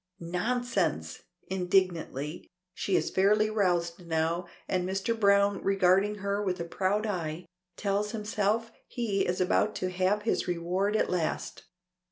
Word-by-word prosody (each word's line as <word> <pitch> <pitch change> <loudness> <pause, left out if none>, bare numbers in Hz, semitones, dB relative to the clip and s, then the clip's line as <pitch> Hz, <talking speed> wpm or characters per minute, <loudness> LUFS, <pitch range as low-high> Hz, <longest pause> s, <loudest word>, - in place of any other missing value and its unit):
"Nonsense," 235 +9 -1 0.2
indignantly. 180 -5 -1 0.2
She 190 +1 -1
is 160 -2 +1
fairly 210 +3 +3
roused 180 -4 0
now, 165 +2 0 0.2
and 185 -1 0
Mr. 195 +4 0
Browne 200 -1 +4
regarding 195 +1 +3
her 200 0 -2
with 185 -3 -1
a 170 - -3
proud 195 +5 0
eye, 175 -4 -3 0.3
tells 205 0 0
himself 215 +1 -1 0.2
he 210 -6 -1
is 180 +1 -1
about 190 +3 +2
to 185 0 -2
have 190 +3 +1
his 225 - 0
reward 180 +4 0
at - - +2
last. 175 -3 -2
190 Hz, 135 wpm, -29 LUFS, 180-210 Hz, 0.3 s, Browne